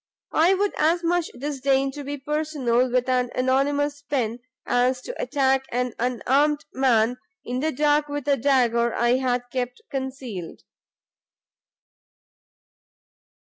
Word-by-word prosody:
I 345 +5 +4
would 405 +1 0
as 330 +3 +2
much 345 0 +1
disdain 270 0 -1
to 290 +1 -7
be 285 +1 -4
personal 275 -4 0
with 250 +1 +1
an 250 -1 +1
anonymous 285 +3 +1
pen, 250 -5 -2 0.3
as 250 +1 +2
to - - -6
attack 270 - +1
an 250 0 -1
unarmed 270 +5 +1
man 250 -2 +2 0.3
in 250 +1 -2
the 315 +3 0
dark 295 +1 +2
with 290 -1 -5
a 285 - +4
dagger 235 -3 +2
I 240 +2 +3
had 250 -2 0
kept 250 -1 -3
concealed." 260 - -6
265 Hz, 125 wpm, -24 LUFS, 250-290 Hz, 0.3 s, I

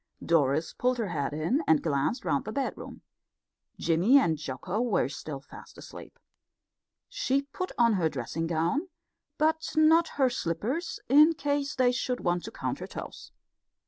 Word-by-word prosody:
Doris 155 -1 +2
pulled 250 0 0
her 225 -5 -2
head 145 -5 -2
in 160 - 0
and 160 - +4
glanced 145 - -1
round 140 - 0
the 215 - -4
bedroom. 270 +2 -5 0.7
Jimmy 175 +11 +4
and 170 -13 +3
Jocko 155 - -4
were 225 - +1
still 140 0 -7
fast 135 - -14
asleep. - - -11 0.9
She 275 +2 0
put 365 +6 -5
on 235 -2 +4
her 175 -5 +1
dressing 165 +1 -4
gown, 170 - -1 0.5
but 320 +1 0
not 320 +2 +5
her 265 -3 +3
slippers, 240 - -3
in 300 +5 +6
case 285 0 -1
they 255 -1 +3
should 250 0 -2
want 175 0 -1
to - - -7
count - - -4
her - - -6
toes. - - -9
230 Hz, 155 wpm, -28 LUFS, -, 0.9 s, in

